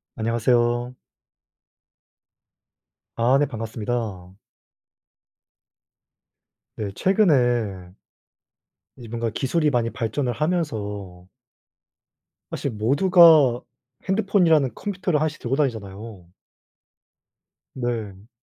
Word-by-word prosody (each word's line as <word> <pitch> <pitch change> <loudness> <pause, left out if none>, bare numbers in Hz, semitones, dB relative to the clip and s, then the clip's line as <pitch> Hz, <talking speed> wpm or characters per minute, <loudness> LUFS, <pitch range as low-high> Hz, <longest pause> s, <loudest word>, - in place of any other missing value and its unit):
안녕하세요. 120 +2 0 2.2
아 120 +4 +3
네 145 - +2
반갑습니다. 110 -4 -5 2.4
네, 105 -2 -4
최근에 120 - +1 1.0
이 120 - -11
뭔가 115 +1 -3
기술이 150 +7 0
많이 120 -4 0
발전을 120 +3 -2
하면서 105 - -3 1.2
사실 140 - -4
모두가 145 - +5 0.5
핸드폰이라는 185 - +2
컴퓨터를 185 -6 -2
하나씩 155 0 -2
들고 125 +2 -2
다니잖아요. 110 - -4 1.4
네. 110 -5 -5
120 Hz, 180 characters per minute, -23 LUFS, 110-150 Hz, 2.4 s, 모두가